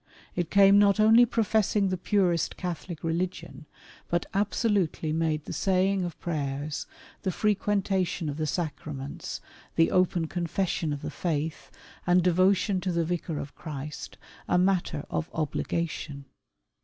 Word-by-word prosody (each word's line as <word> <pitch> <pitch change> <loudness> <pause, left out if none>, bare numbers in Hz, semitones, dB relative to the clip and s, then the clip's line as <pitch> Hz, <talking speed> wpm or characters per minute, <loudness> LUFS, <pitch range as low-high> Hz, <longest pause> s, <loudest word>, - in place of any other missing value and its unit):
It 175 -2 -1
came 200 0 +7
not 200 0 +4
only 225 +3 +7
professing 215 -3 +2
the 185 - 0
purest 180 -3 +1
Catholic 175 -2 -5
religion, 165 -4 -3 0.4
but 170 0 0
abso 205 +4 +1
lutely 165 -5 0
made 160 -2 0
the - - -5
saying 190 0 +2
of 175 - -7
prayers, 145 -2 -3 0.3
the 190 - -1
frequentation 195 -3 0
of 145 0 -3
the 155 -1 -1
sacraments, 145 -3 -4 0.3
the 165 - +4
open 180 -2 +2
confession 170 -1 -1
of 145 -1 -4
the - - -4
Faith, 155 -2 -3 0.4
and 180 0 +5
devotion 185 +2 +3
to 185 - -1
the 170 -1 +1
Vicar 165 -2 -2
of 140 - -6
Christ, 150 -2 -7 0.3
a - - +3
matter 180 -5 +1
of 160 - -2
obligation. 155 -2 -2
175 Hz, 140 wpm, -28 LUFS, 155-195 Hz, 0.4 s, came